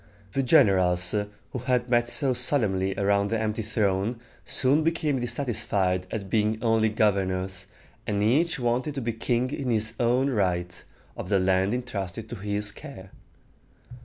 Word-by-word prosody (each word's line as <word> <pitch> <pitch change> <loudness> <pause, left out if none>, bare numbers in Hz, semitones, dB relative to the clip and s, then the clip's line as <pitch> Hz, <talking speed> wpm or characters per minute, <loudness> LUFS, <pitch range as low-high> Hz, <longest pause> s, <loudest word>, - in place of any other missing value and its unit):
The 135 - 0
generals 95 - +3 0.4
who 125 - -4
had 125 -2 +1
met 120 -1 +2
so 130 +2 +1
solemnly 105 -7 +1
around 100 0 +1
the 115 - 0
empty 110 0 -2
throne 105 +1 -1 0.3
soon 140 +4 +2
became 155 -4 0
dissatisfied 105 -7 0
at 100 -3 -5
being 110 +1 +1
only 115 -1 +3
governors, 95 -3 -1 0.4
and 105 -2 0
each 150 +10 +2
wanted 125 +4 -1
to 135 - -3
be 115 -1 -2
king 120 +3 -1
in 140 -3 -3
his 110 -1 0
own 125 +3 +2
right, 90 -5 -1 0.3
of - - -7
the 100 - +3
land 95 +3 +1
intrusted 110 -4 -5
to 120 - -5
his 105 +1 -2
care. 100 -11 -11
110 Hz, 150 wpm, -26 LUFS, 95-125 Hz, 0.4 s, generals